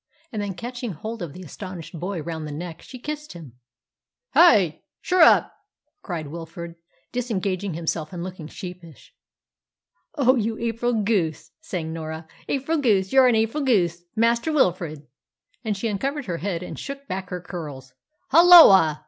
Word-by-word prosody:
And 215 - -3
then, 200 -2 -4
catching 245 -1 -5
hold 220 +8 -7
of 165 -5 -5
the 185 - -10
astonished 175 -1 -8
boy 180 -2 -4
round 160 -2 -5
the - - -6
neck, 165 +2 -7
she 255 - -11
kissed 300 +4 -6
him. 145 -9 -12 0.7
"Hi! 205 - +5 0.2
Shurrup!" 360 -3 +5 0.5
cried 165 - -5
Wilfrid, 170 +1 -8 0.4
disengaging 200 -7 -2
himself 160 -1 -3
and 175 -2 -5
looking 180 -4 -7
sheepish. 175 -3 -11 1.0
"Oh, 260 -3 +4
you 225 -2 -1
April 235 +1 -1
goose!" 190 -7 -1
sang 175 - -5
Norah; 160 0 -6 0.2
"April 285 +4 -1
goose 200 -7 +2
you're 265 -1 +7
an 245 - +4
April 225 +7 0
goose, 175 -10 +2
Master 235 +6 +2
Wilfrid!" 175 - 0 0.6
And 215 -3 -2
she 230 - -2
uncovered 275 +7 -2
her 175 -3 -3
head 180 -1 -3
and - - -7
shook 275 0 -7
back 190 -2 -4
her 180 - -4
curls. 145 -7 -8 0.4
"Halloa!" 280 - +8
190 Hz, 150 wpm, -24 LUFS, 165-240 Hz, 1.0 s, Halloa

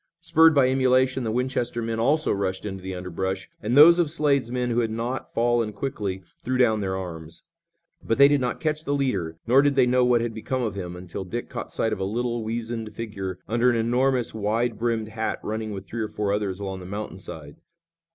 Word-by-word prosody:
Spurred 160 -1 +5
by 135 -2 +5
emulation 130 0 +2
the 115 - -1
Winchester 125 0 -1
men 115 -1 -2
also 150 +7 +2
rushed 95 0 -2
into 95 -2 -5
the 95 0 -5
underbrush, 95 +1 -4
and 120 +5 0
those 170 +4 +9
of 170 -4 +2
Slade's 145 -6 +1
men 125 -1 -1
who 120 - +1
had 115 -2 +1
not 120 +4 -4
fallen 120 -2 +1
quickly 100 -6 -4 0.2
threw 130 +1 -1
down 110 -4 +3
their 95 -1 -2
arms. 85 -3 -8 0.6
But 115 - 0
they 140 +1 +8
did 145 -1 +2
not 125 -1 -2
catch 155 -1 -1
the 145 -2 -1
leader, 95 - -1
nor 125 +4 +5
did 145 -1 +2
they 130 -2 +5
know 125 +1 +3
what 125 -1 +3
had 115 -1 -2
become 125 +4 -3
of 110 -4 -2
him, 90 -3 -6
until 90 +1 -6
Dick 115 +6 -5
caught - - -6
sight 110 - 0
of - - -4
a - - -1
little, 120 +3 -2
weazened 115 0 -4
figure 95 -5 -5
under 120 +3 +3
an 120 - +2
enormous 125 +2 +1
wide 110 +2 -1
brimmed 115 -2 -1
hat 110 0 -3
running 110 0 -3
with 95 -1 -6
three 115 +3 -5
or 110 - -2
four 105 -1 -1
others 100 -2 -2
along 95 -2 -4
the 90 - -9
mountain 105 +3 -6
side. - - -9
115 Hz, 220 wpm, -25 LUFS, 100-125 Hz, 0.6 s, those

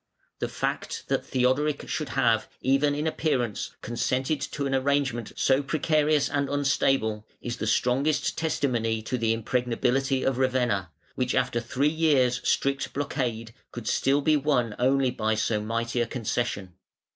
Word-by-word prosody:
The - - -1
fact - - -3
that - - +1
Theodoric 130 +4 0
should 155 -4 -3
have, 115 -4 +2
even 140 +2 +2
in 150 +2 -2
appearance, 130 -9 -1
consented 130 +5 -1
to 145 - -3
an 135 - -1
arrangement 135 -3 0
so 135 +1 +3
precarious 150 0 +2
and 140 -2 -1
unstable, 135 -6 +1
is 120 -1 -5
the 110 - -3
strongest 135 +7 +1
testimony 120 -8 0
to 125 +3 -2
the 115 -1 +2
impregnability 125 +3 0
of 135 -1 0
Ravenna, 125 -9 +1 0.2
which 125 -1 -1
after 125 -2 +1
three 130 +4 0
years' 145 -6 +2
strict 140 0 0
blockade, 120 -5 -3 0.2
could 120 -2 -7
still 140 +2 +2
be 155 +2 +3
won 135 -6 +1
only 130 +1 +3
by 110 -3 0
so 110 0 0
mighty 115 +2 -1
a 120 - 0
concession. 115 -5 -3
130 Hz, 145 wpm, -26 LUFS, 115-140 Hz, 0.2 s, so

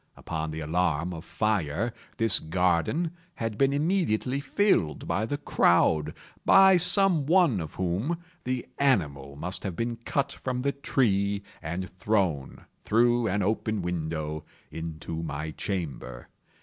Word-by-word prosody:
Upon 80 -1 -4
the 80 +1 -5
alarm 85 +1 0
of 80 -1 -7
fire, 105 0 -1 0.2
this 115 -4 +4
garden 90 - +1 0.2
had 115 -2 -3
been 135 +5 +3
immediately 140 - +1
filled 140 - +1
by 110 +2 0
the 145 - -2
crowd—by 145 - +3
some 180 -4 +3
one 170 - +4
of 80 -2 -7
whom 95 - -1 0.3
the 125 -1 -2
animal 75 - +1
must 90 +6 -4
have 95 -4 -3
been 115 +2 -2
cut 140 +4 -1
from 125 -2 -4
the 140 - +2
tree 100 -8 0 0.2
and 85 +4 -4
thrown, 90 -6 -1 0.2
through 120 +1 +3
an 100 +1 0
open 110 0 -1
window, 80 -3 -3 0.3
into 80 0 -5
my 80 -1 -4
chamber. 75 - -5
100 Hz, 130 wpm, -27 LUFS, 80-130 Hz, 0.3 s, this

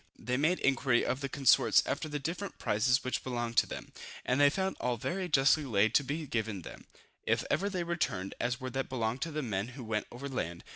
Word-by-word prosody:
They 125 - -2
made 155 +7 +2
inquiry 130 -3 +2
of 130 - -1
their 140 - -2
consorts 130 -4 +4
after 155 +2 -2
the 150 - -2
different 170 +7 -4
prizes 120 +5 +2
which 130 - -2
belonged 120 -2 -3
to - - +5
them, - - -7 0.3
and 130 +3 +2
they 145 - +7
found 190 +5 -1
all 125 0 0
very 180 - -3
justly 145 +1 +4
laid 110 -5 +3
by - - +7
to - - -6
be 150 +4 -3
given 110 - -2
them, - - -11 0.4
if - - +2
ever 185 +8 +1
they 185 -3 -2
returned, 125 - -2
as 125 +2 -1
were 130 -1 -5
what 135 0 -2
belonged 120 -1 -2
to 165 - -2
the 155 0 -2
men 100 -3 -2
who 130 - -6
went 110 -2 -2
over 125 +4 -6
land. 85 -11 -4
130 Hz, 230 wpm, -31 LUFS, 115-150 Hz, 0.4 s, they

